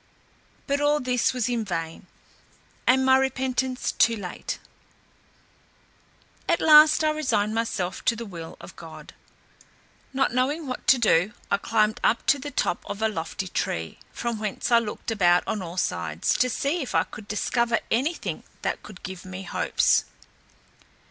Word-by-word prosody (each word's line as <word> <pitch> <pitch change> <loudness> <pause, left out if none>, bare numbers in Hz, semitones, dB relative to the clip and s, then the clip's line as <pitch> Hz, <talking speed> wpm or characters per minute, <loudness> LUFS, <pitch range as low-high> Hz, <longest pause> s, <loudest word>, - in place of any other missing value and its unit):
But 280 0 0
all 295 +1 +3
this 250 -2 +1
was 250 -3 -1
in 240 -2 -1
vain, 165 -5 -5 0.8
and 260 +1 +4
my 260 0 +6
repentance 260 -1 -1
too 230 - +3
late. 185 -5 -5 1.9
At - - +3
last 305 0 +7
I 310 - +3
resigned 220 -9 0
myself 205 -6 -2
to 230 - +3
the 235 +1 -6
will 170 -5 -9
of - - -12
God. - - -11 1.0
Not 270 -2 +1
knowing 280 +6 0
what 255 -2 -6
to 265 - +7
do, 210 -4 +3 0.2
I - - +4
climbed 215 0 +1
up 230 - +2
to 280 - -8
the 290 - -6
top 255 - -1
of 200 - -4
a - - +4
lofty 185 -1 -4
tree, 80 - -3
from 235 -2 -3
whence 215 +2 -3
I 235 - +7
looked 225 0 -5
about 180 -5 +3
on 210 - -2
all 175 0 -7
sides, - - -1
to 255 - +3
see 285 +8 -1
if 265 - -5
I - - +4
could 210 -1 -11
discover 235 +3 0
any 280 +9 +1
thing - - -5 0.2
that - - -2
could 205 -3 -13
give 185 -1 -7
me 185 +1 -7
hopes. - - +2
230 Hz, 160 wpm, -25 LUFS, 200-260 Hz, 1.9 s, last